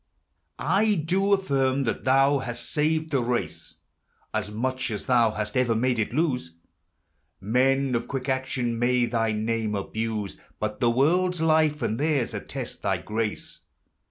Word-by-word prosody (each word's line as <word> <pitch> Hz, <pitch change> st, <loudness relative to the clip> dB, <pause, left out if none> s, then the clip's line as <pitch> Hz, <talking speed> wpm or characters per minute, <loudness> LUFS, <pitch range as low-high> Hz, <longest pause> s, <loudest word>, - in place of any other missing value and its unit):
I 210 Hz, +1 st, +2 dB
do 185 Hz, +5 st, +1 dB
affirm 140 Hz, -8 st, +2 dB
that 115 Hz, -, -3 dB
thou 135 Hz, +2 st, +4 dB
hast 120 Hz, -2 st, -5 dB
saved 155 Hz, +1 st, 0 dB
the 135 Hz, -3 st, +2 dB
race 115 Hz, -9 st, -3 dB, 0.6 s
As -, -, -2 dB
much 130 Hz, +5 st, -2 dB
as 105 Hz, -3 st, -4 dB
thou 120 Hz, -3 st, +4 dB
hast 105 Hz, -1 st, -4 dB
ever 125 Hz, -3 st, +2 dB
made 125 Hz, +1 st, +1 dB
it 110 Hz, -, 0 dB
to 150 Hz, -5 st, +1 dB, 1.0 s
Men 130 Hz, +6 st, +2 dB
of 120 Hz, -1 st, -1 dB
quick 135 Hz, -2 st, -4 dB
action 130 Hz, -3 st, -1 dB
may 125 Hz, 0 st, +3 dB
thy 115 Hz, -1 st, 0 dB
name 110 Hz, 0 st, -1 dB
abus 110 Hz, 0 st, -3 dB, 0.2 s
But 110 Hz, 0 st, -3 dB
the 120 Hz, -, +3 dB
world's 175 Hz, +8 st, +2 dB
life 155 Hz, -2 st, +2 dB
and 110 Hz, -, -1 dB
theirs 145 Hz, -5 st, 0 dB
attest -, -, -6 dB
thy -, -, 0 dB
grace. 110 Hz, 0 st, -4 dB
125 Hz, 150 wpm, -26 LUFS, 115-145 Hz, 1.0 s, thou